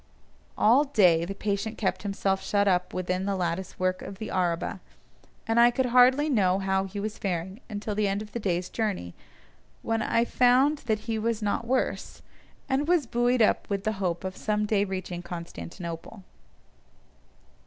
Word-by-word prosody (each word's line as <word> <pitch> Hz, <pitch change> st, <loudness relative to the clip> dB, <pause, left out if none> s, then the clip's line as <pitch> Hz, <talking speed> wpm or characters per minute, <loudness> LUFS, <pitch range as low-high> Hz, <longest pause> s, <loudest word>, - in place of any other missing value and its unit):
All 250 Hz, +7 st, +5 dB
day 180 Hz, -, +4 dB
the 195 Hz, +3 st, -5 dB
patient 205 Hz, +2 st, -2 dB
kept 190 Hz, -3 st, -1 dB
himself 195 Hz, -1 st, -1 dB
shut 205 Hz, 0 st, +1 dB
up 180 Hz, -1 st, +1 dB
within 185 Hz, +1 st, -2 dB
the 200 Hz, -1 st, 0 dB
lattice 180 Hz, 0 st, -3 dB
work 185 Hz, 0 st, 0 dB
of 195 Hz, 0 st, -8 dB
the 220 Hz, -, -6 dB
araba, 180 Hz, +1 st, -1 dB, 0.7 s
and 225 Hz, +1 st, +2 dB
I 240 Hz, 0 st, +8 dB
could 260 Hz, +2 st, 0 dB
hardly 250 Hz, +4 st, +5 dB
know 195 Hz, -10 st, +2 dB
how 190 Hz, 0 st, 0 dB
he 200 Hz, +1 st, -6 dB
was 210 Hz, +1 st, -4 dB
faring 190 Hz, +3 st, -3 dB
until 210 Hz, 0 st, -4 dB
the 210 Hz, 0 st, +1 dB
end 200 Hz, +2 st, -1 dB
of 210 Hz, -, -13 dB
the 235 Hz, -, -4 dB
day's 180 Hz, -3 st, -1 dB
journey, 200 Hz, -, -3 dB, 0.7 s
when 225 Hz, 0 st, 0 dB
I 230 Hz, +2 st, +2 dB
found 255 Hz, +5 st, +3 dB
that 215 Hz, -1 st, +1 dB
he 225 Hz, 0 st, -2 dB
was 225 Hz, 0 st, -1 dB
not 210 Hz, +3 st, -1 dB
worse, 260 Hz, +1 st, -2 dB, 0.4 s
and 280 Hz, +2 st, 0 dB
was 345 Hz, -5 st, +3 dB
buoyed 240 Hz, 0 st, +2 dB
up -, -, +1 dB
with 200 Hz, -1 st, -2 dB
the 215 Hz, -, 0 dB
hope 175 Hz, -2 st, -1 dB
of 190 Hz, 0 st, -4 dB
some 210 Hz, -1 st, -1 dB
day 205 Hz, -1 st, +1 dB
reaching 185 Hz, -2 st, -5 dB
Constantinople. 170 Hz, +2 st, -8 dB
205 Hz, 175 wpm, -27 LUFS, 185-230 Hz, 0.7 s, I